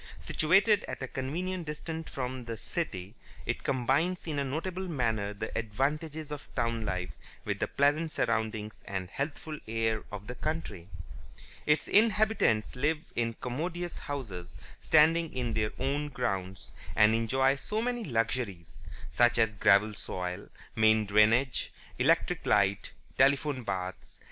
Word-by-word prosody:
Situated 195 +6 +3
at - - -5
a - - -2
convenient 170 +7 -3
distance 160 +1 -5
from 130 -1 -4
the 115 -1 -5
city, 105 - -4 0.3
it - - -2
combines 140 +8 +1
in 155 -4 -2
a - - +1
notable 175 +7 -3
manner 110 - 0
the 100 - -6
advantages 150 +7 -2
of 145 -1 -6
town 115 -1 0
life 90 -3 -2 0.3
with - - -2
the - - 0
pleasant 145 +3 +2
surroundings 110 -6 -1
and 95 -1 -4
healthful 150 +2 -4
air 110 0 0
of 105 -1 -6
the 125 - -5
country. 125 - -4 0.8
Its 150 +1 +3
inhabitants 210 - +3
live 150 +5 +1 0.2
in 115 -1 0
commodious 170 +7 -3
houses, 100 -12 -6 0.2
standing 160 +1 +4
in 120 -3 -1
their 110 -1 0
own 145 +3 -1
grounds, 100 -8 -3 0.2
and 105 +1 +6
enjoy 130 +4 +3
so 210 +10 -3
many 240 0 -1
luxuries 115 - -2 0.3
such 120 0 +4
as 110 -2 +3
gravel 100 +1 +4
soil, 90 -2 -5 0.3
main 110 0 +4
drainage, 110 +6 +3 0.3
electric - - +2
light, 100 -1 +3 0.3
telephone, 140 0 +3
baths 95 -4 -3
(h. - - -27
and - - -20
c.) - - -24
125 Hz, 145 wpm, -30 LUFS, 110-155 Hz, 0.8 s, and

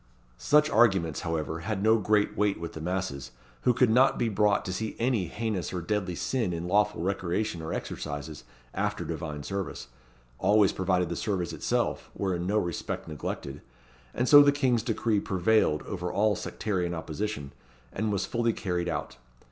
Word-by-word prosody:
Such 150 - +4
arguments, 95 - +3
however, 80 -1 -3
had 100 +4 -3
no 110 +1 +5
great 105 0 +2
weight 105 -1 +1
with 85 0 -6
the 80 - -7
masses, 85 -6 -3 0.3
who - - +4
could 125 -1 +3
not 130 +4 +4
be 120 - +1
brought 105 -1 +2
to 90 - -3
see 110 +3 -3
any 115 -7 +1
heinous 105 -4 -3
or 90 - -3
deadly 90 0 -2
sin 115 -2 -1
in 85 +1 -4
lawful 105 -1 +2
recreation 95 0 -1
or 80 - -5
exercises 75 -1 -5 0.3
after - - -2
divine 75 -1 -5
service, 95 -9 -5 0.5
always 105 -2 +4
provided 90 -1 0
the - - -2
service 95 -5 -2
itself - - -1
were 95 -2 -1
in 85 +1 -3
no 105 +2 +1
respect 85 -5 -3
neglected; 75 -2 -5 0.5
and 125 - -1
so 145 +2 +10
the 145 0 +6
King's 130 -5 +1
decree 115 -2 0
prevailed 95 -4 +2
over 90 -3 -4
all 105 +2 +2
sectarian 90 -5 -2
opposition, 80 -2 -4 0.4
and 110 +1 -1
was 100 -2 0
fully 115 -1 0
carried 90 -4 -2
out. 65 - -4
95 Hz, 170 wpm, -28 LUFS, 85-110 Hz, 0.5 s, so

